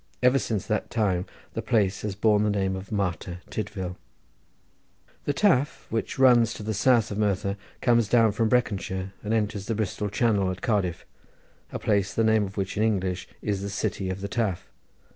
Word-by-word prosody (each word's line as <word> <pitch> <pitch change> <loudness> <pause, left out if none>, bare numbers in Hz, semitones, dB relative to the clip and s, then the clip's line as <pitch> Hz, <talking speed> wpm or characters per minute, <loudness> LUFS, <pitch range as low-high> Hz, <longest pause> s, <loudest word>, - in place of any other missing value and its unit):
Ever 125 +2 +5
since 110 -7 -2
that 110 - -1
time 95 -5 0 0.3
the - - -2
place 105 -5 +1
has 105 -2 -3
borne 105 0 +3
the 105 - +2
name 95 -2 0
of 95 +3 -8
Martyr 90 -3 -2
Tydvil. 95 -4 -4 1.3
The 145 - +1
Taf, 150 -7 +2
which 115 0 -2
runs 120 -3 +5
to - - -7
the 110 +1 -2
south 115 +1 +3
of 105 - -3
Merthyr, 100 -1 0 0.3
comes 120 -3 +3
down 115 -1 +4
from 110 +2 +1
Breconshire, 95 -5 0
and 105 - -4
enters 105 -3 -1
the 115 - 0
Bristol 105 -1 -2
Channel 100 -3 +2
at 95 0 -5
Cardiff, 95 -6 0 0.7
a - - -3
place 100 -2 0
the 115 - +2
name 110 -1 +3
of 95 +2 -9
which 95 -1 -2
in - - +1
English 95 -4 0 0.2
is 100 -2 -1
the 100 - -3
city 95 -1 -2
on 95 - -3
the 100 - -3
Taf. 105 -5 -1
105 Hz, 185 wpm, -26 LUFS, 95-115 Hz, 1.3 s, Ever